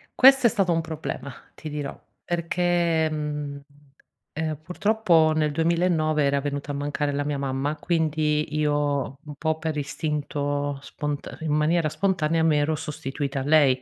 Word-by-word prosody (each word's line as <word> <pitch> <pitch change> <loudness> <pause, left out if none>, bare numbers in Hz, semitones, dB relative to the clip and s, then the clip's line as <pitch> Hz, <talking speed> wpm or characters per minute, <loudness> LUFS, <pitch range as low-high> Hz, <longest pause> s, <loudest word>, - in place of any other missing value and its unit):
Questo 270 -1 +7
è - - +3
stato 195 -4 +1
un 165 0 +2
problema! 155 -3 -5 0.2
Ti 155 - -7
dirò, 145 -2 -5 0.3
perché 170 -1 +1
mhmm, 150 -2 -4 0.7
ehm, 155 -1 -2
purtroppo 180 -3 +3
nel 155 -1 +1
2009 165 -1 +2
era 140 0 +2
venuta 145 +1 -3
a - - -3
mancare 145 0 -1
la 145 +1 0
mia 145 -1 -1
mamma, 135 +2 -1
quindi 155 -2 0
io 145 -2 0
un 150 -1 -8
po' 160 +1 0
per 160 -1 -2
istinto 145 -1 -2
spont 145 0 -5
in 155 -2 -1
maniera 155 +1 +2
spontanea 165 -3 +1
mi 160 -2 +4
ero 145 +2 +1
sostituita 145 -2 -4
a - - -3
lei. 140 -3 +4
150 Hz, 150 wpm, -25 LUFS, 145-160 Hz, 0.7 s, Questo